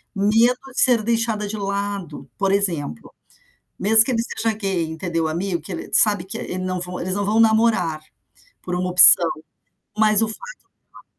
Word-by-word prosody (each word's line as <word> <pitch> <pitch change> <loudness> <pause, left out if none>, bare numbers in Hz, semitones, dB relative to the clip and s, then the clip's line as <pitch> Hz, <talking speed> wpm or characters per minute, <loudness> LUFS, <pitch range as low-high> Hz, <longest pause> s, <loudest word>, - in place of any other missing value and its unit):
Medo 225 +5 +1
de - - 0
ser 245 -3 +4
deixada 225 -2 -2
de 215 +1 -6
lado, 200 -7 -6
por 195 -1 -1
exemplo. 170 - -2 0.7
Mesmo 220 +3 +5
que 260 - -3
ele 230 -2 -1
seja 225 -1 -3
gay, 195 -5 -3
entendeu, 165 0 -4
o - - -1
amigo, 170 +3 -4
que 195 - -11
ele, 165 - -8
sabe, 205 -4 +4
que 190 - -6
e - - -7
ele 180 - -6
não 185 0 -4
vão 180 0 -5
eles 185 +1 -4
não 200 0 -3
vão 215 +2 0
namorar, 220 -8 +1 0.6
por 180 - -5
uma 180 +1 -3
opção, 175 -1 +8 0.7
mas 215 0 +4
o - - +1
fato 220 - -5 0.5
dela - - -18
200 Hz, 190 wpm, -20 LUFS, 180-220 Hz, 0.7 s, opção